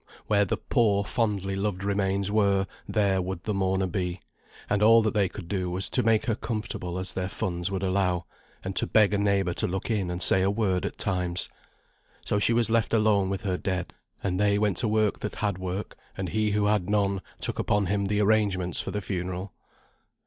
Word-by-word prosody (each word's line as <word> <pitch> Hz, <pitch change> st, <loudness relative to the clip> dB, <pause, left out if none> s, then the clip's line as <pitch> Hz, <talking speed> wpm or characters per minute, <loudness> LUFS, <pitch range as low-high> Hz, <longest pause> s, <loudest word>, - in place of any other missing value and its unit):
where 100 Hz, -1 st, +3 dB
the -, -, -1 dB
poor, 105 Hz, -5 st, +1 dB
fondly 100 Hz, -5 st, -1 dB
loved 100 Hz, -1 st, -2 dB
remains 100 Hz, -1 st, 0 dB
were, 100 Hz, -2 st, +2 dB, 0.2 s
there 100 Hz, -3 st, +2 dB
would 90 Hz, -1 st, -5 dB
the 105 Hz, -, -2 dB
mourner 95 Hz, -1 st, +1 dB
be; 90 Hz, -1 st, -3 dB, 0.5 s
and 105 Hz, 0 st, 0 dB
all 115 Hz, +1 st, +6 dB
that 110 Hz, -, 0 dB
they 100 Hz, -4 st, +2 dB
could 95 Hz, -2 st, -9 dB
do 95 Hz, -1 st, -2 dB
was 90 Hz, +2 st, -2 dB
to 125 Hz, -, +3 dB
make 115 Hz, +1 st, +2 dB
her 120 Hz, -, +1 dB
as -, -, -6 dB
comfortable 105 Hz, -6 st, -4 dB
as 95 Hz, 0 st, -1 dB
their 95 Hz, 0 st, -2 dB
funds 90 Hz, -2 st, -2 dB
would 95 Hz, -1 st, -3 dB
allow, 95 Hz, -3 st, 0 dB, 0.4 s
and 95 Hz, 0 st, -4 dB
to -, -, 0 dB
beg 105 Hz, -2 st, +4 dB
a -, -, +2 dB
neighbour 100 Hz, -3 st, +1 dB
to -, -, 0 dB
look 95 Hz, +5 st, -3 dB
in 100 Hz, -5 st, 0 dB
and 90 Hz, 0 st, -3 dB
say 95 Hz, -, +6 dB
a 95 Hz, -, +2 dB
word 100 Hz, -3 st, 0 dB
at -, -, -8 dB
times. 90 Hz, -2 st, -1 dB, 0.8 s
So 105 Hz, -, +1 dB
she 105 Hz, -, +3 dB
was 115 Hz, 0 st, +3 dB
left 115 Hz, 0 st, +2 dB
alone 105 Hz, -3 st, +3 dB
with 95 Hz, -1 st, -3 dB
her 95 Hz, -3 st, -1 dB
dead, 95 Hz, -1 st, -3 dB, 0.3 s
and 95 Hz, -1 st, -1 dB
they 100 Hz, 0 st, +3 dB
went 105 Hz, -4 st, +1 dB
to 115 Hz, -, +1 dB
work 110 Hz, -1 st, +1 dB
that 105 Hz, -, -5 dB
had 100 Hz, -3 st, -2 dB
work, 95 Hz, +2 st, -4 dB, 0.2 s
and 95 Hz, -2 st, -3 dB
he 110 Hz, +3 st, +1 dB
who 105 Hz, 0 st, +1 dB
had 105 Hz, -3 st, +1 dB
none, 100 Hz, -2 st, +1 dB, 0.2 s
took -, -, -2 dB
upon 105 Hz, -1 st, +1 dB
him 100 Hz, +2 st, 0 dB
the 105 Hz, +1 st, +1 dB
arrangements 100 Hz, -4 st, +2 dB
for -, -, -5 dB
the 105 Hz, -, -3 dB
funeral. 90 Hz, 0 st, -4 dB
100 Hz, 215 wpm, -27 LUFS, 95-105 Hz, 0.8 s, all